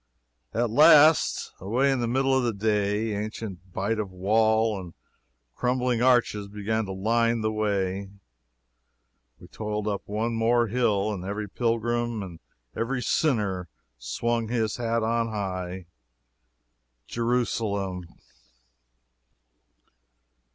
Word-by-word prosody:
At 115 0 0
last, 155 +3 +6
away 125 +9 +1
in 135 - 0
the 120 - 0
middle 135 +2 +2
of 130 - +2
the 120 -2 0
day, 105 +1 0
ancient 100 -3 -6
bite 100 +5 -1
of 105 -2 -2
wall 110 +3 +2
and 85 -3 -11 0.6
crumbling 125 -1 0
arches 120 -5 +2
began 105 +2 -2
to 95 - -6
line 115 +4 +1
the 110 0 0
way 100 -2 -1 1.3
we - - -13
toiled 105 -1 -4
up 100 -2 -1
one 110 +3 -1
more 115 +1 +2
hill, 110 -3 +1
and 90 -3 -6
every 100 +2 -4
pilgrim 120 0 -1
and 85 -4 -9 0.4
every 125 +2 -2
sinner 105 - 0 0.3
swung 115 - -1
his 110 -2 -1
hat 115 -1 0
on 115 +1 +1
high! 95 -4 -4 1.2
Jerusalem! 110 -6 -1
110 Hz, 115 wpm, -26 LUFS, 100-120 Hz, 1.3 s, last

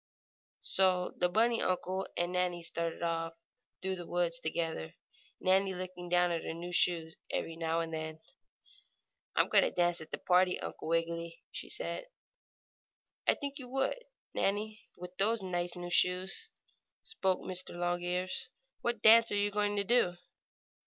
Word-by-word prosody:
So 185 -1 +3
the 180 - +2
bunny 230 +4 +3
uncle 185 +1 -1
and 175 +1 0
Nannie 180 -1 0
started 165 0 -2
off 165 0 -1 0.5
through 190 0 -1
the 175 - -7
woods 175 -1 +1
together, 160 - -2 0.5
Nannie 190 0 +3
looking 180 -1 -6
down 175 0 +4
at 165 -1 -1
her 160 - -4
new 175 +1 -6
shoes 165 -2 +2
every 165 - -2
now 165 0 0
and 165 -1 -4
then. 160 0 -4 1.2
"I'm - - +4
going - - +6
to - - +2
dance 175 -1 +1
at 160 - -9
the - - -3
party, 180 0 +3
Uncle - - -6
Wiggily!" 165 0 -1
she - - -6
said. - - -2 1.2
"I - - +7
should - - -13
think 285 0 -3
you 250 -2 -8
would, 270 - -1 0.3
Nannie, 210 +2 0 0.2
with 180 +1 -9
those 215 +1 +2
nice 175 -1 -1
new 175 0 -6
shoes," 180 +2 +2 0.5
spoke 190 - 0
Mr. 185 -1 -2
Longears. 175 +4 -1 0.3
"What 235 -2 -1
dance 230 +1 +8
are - - +1
you 205 0 +2
going 205 0 +1
to 200 - +1
do?" 230 -4 +3
180 Hz, 160 wpm, -32 LUFS, 170-195 Hz, 1.2 s, dance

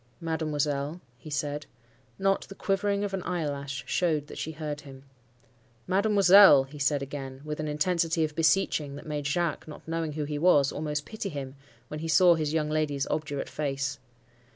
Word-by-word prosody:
"'Mademoiselle,' 150 -1 -2 0.2
he 155 - -10
said. 145 0 -3 0.5
Not 195 0 +1
the 195 - -10
quivering 200 +1 0
of 200 -1 -3
an 190 - -2
eyelash 140 -6 -3
showed 155 -5 0
that - - -11
she 160 - -4
heard 150 -1 -5
him. 135 -2 -12 0.8
'Mademoiselle!' 195 - +7
he 140 +2 -12
said 140 0 +1
again, 135 -1 -7
with 150 0 -4
an 155 - -2
intensity 165 +2 +1
of 155 -1 -2
beseeching 155 -3 +1
that 145 - -10
made 150 -2 -3
Jacques—not 160 -1 -3
knowing 165 -2 -2
who 150 0 -3
he 145 0 -3
was—almost 150 -2 +2
pity 220 -2 -5
him, 135 -3 -6 0.3
when 150 - -6
he 165 - -4
saw 175 +3 +6
his 155 -3 -1
young 155 -1 0
lady's 150 -3 0
obdurate 150 -2 -2
face. 140 -1 -3
150 Hz, 165 wpm, -28 LUFS, 145-170 Hz, 0.8 s, Mademoiselle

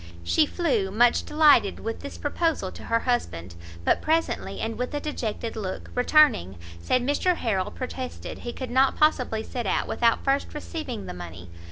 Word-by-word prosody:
She 300 - +3
flew, 255 - 0
much 235 +4 +3
delighted, 300 -10 +4
with 225 0 -4
this 280 - -8
proposal 300 - -1
to - - -11
her 230 0 +1
husband; 85 - -2 0.3
but - - +3
presently, 325 +1 -1
and 225 0 -2
with 250 +5 -3
a - - 0
dejected 235 -6 -4
look, 195 -4 -5
returning, 250 - +4 0.2
said 255 - +1
Mr 290 +7 +1
Harrel 195 - -1
protested 255 0 -6
he 240 - -5
could 255 0 -6
not 265 +2 +3
possibly 250 -7 +2
set 240 -3 -4
out - - 0
without 230 -1 +2
first 275 +2 0
receiving 295 -8 -5
the - - -6
money. 85 0 -9
245 Hz, 170 wpm, -26 LUFS, 210-290 Hz, 0.3 s, delighted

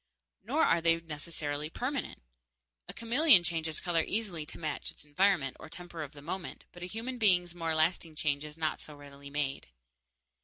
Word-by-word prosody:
Nor - - +2
are 170 - +4
they 165 0 +4
necessarily 150 -2 -4
permanent. 255 - -4 0.7
A - - -5
chameleon 235 - +6
changes 160 -2 -1
color 170 -2 +1
easily 180 -7 -2
to - - -8
match 155 -2 -3
its - - -12
environment 150 -2 +2
or - - -10
temper 175 -1 -8
of 150 -1 -6
the 145 -1 -12
moment, 175 +3 -6
but 175 - -13
a 180 - -4
human 235 +6 -5
being's 180 -5 +4
more 165 -2 -1
lasting 160 0 +1
change 150 -1 0
is 150 +1 -9
not 155 -1 -1
so 150 - -10
readily 140 -1 -12
made. 140 -1 -2
165 Hz, 180 wpm, -31 LUFS, 150-180 Hz, 0.7 s, chameleon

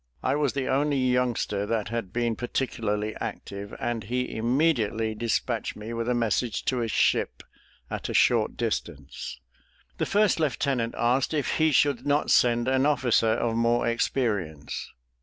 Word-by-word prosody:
I - - +1
was 145 -3 +1
the 135 -2 -2
only 145 +1 +1
youngster 125 -5 0
that 110 -2 -1
had 115 -5 -3
been 120 -1 0
particularly 110 -3 -2
active, 100 +1 -6
and 120 -2 -2
he 125 +3 -2
immediately 115 -3 +1
despatched 115 +1 -1
me 110 +2 -7
with 115 +1 -2
a 125 - +2
message 115 -1 0
to 125 -2 0
a 115 - -1
ship - - +1 0.4
at - - -5
a - - -3
short 115 -3 +3
distance. 85 - -4 0.6
The - - 0
first 205 -4 +3
lieutenant 135 -5 0
asked 125 +6 +1
if 145 - 0
he 160 -1 +3
should 140 -2 +2
not 145 +1 +1
send 120 0 +4
an 130 +2 +3
officer 125 -5 +3
of 115 0 -1
more 115 +1 +2
experience. 105 - -1
120 Hz, 155 wpm, -26 LUFS, 110-130 Hz, 0.6 s, send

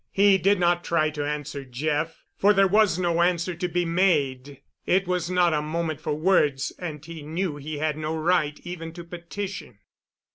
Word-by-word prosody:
He 195 -1 +4
did 195 +2 +3
not 175 0 +2
try 155 -2 +1
to 145 -1 -3
answer 150 -1 -4
Jeff, 150 +5 -2
for 205 +1 +4
there 195 0 +4
was 205 -2 +3
no 170 -2 +1
answer 175 0 +1
to 175 +2 -3
be 175 0 0
made. 145 -7 0 0.3
It 190 +1 +3
was 180 -2 -1
not 180 -2 +3
a 150 - +1
moment 155 0 -3
for 155 -2 -2
words, 150 -5 +2
and 155 -4 -6
he 165 -1 -8
knew 160 +1 -3
he 150 +1 -6
had 155 0 -1
no 155 +1 -3
right 155 -2 +1
even 165 -2 -7
to 175 0 -8
petition. 175 - -7
165 Hz, 185 wpm, -25 LUFS, 150-180 Hz, 0.3 s, He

